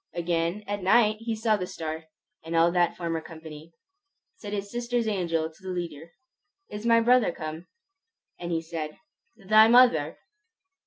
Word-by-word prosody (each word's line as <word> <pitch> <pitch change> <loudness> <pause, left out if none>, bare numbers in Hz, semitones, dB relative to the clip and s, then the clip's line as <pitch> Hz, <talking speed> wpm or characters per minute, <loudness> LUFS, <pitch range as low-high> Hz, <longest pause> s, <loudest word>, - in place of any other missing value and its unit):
Again 170 +3 -1
at 205 0 -4
night 215 +3 +4
he 225 0 -3
saw 220 -1 +1
the 180 -2 -4
star, 160 -1 -6 0.4
and 165 +1 -5
all 165 +1 +4
that 175 -1 +1
former 165 -2 -3
company. 160 0 -11 0.7
Said 205 - -8
his 200 -1 -4
sister's 240 -1 -1
angel 165 -6 -1
to 160 - -23
the 190 - -7
leader, 170 -3 -6 0.6
"Is 210 +2 -5
my 230 0 +6
brother 240 -2 +4
come?" 160 +1 -7 0.7
And 175 0 -5
he 165 -1 -1
said, 160 -2 -6 0.4
"Thy 215 +1 +5
mother!" 230 -11 +4
175 Hz, 155 wpm, -26 LUFS, 165-215 Hz, 0.7 s, my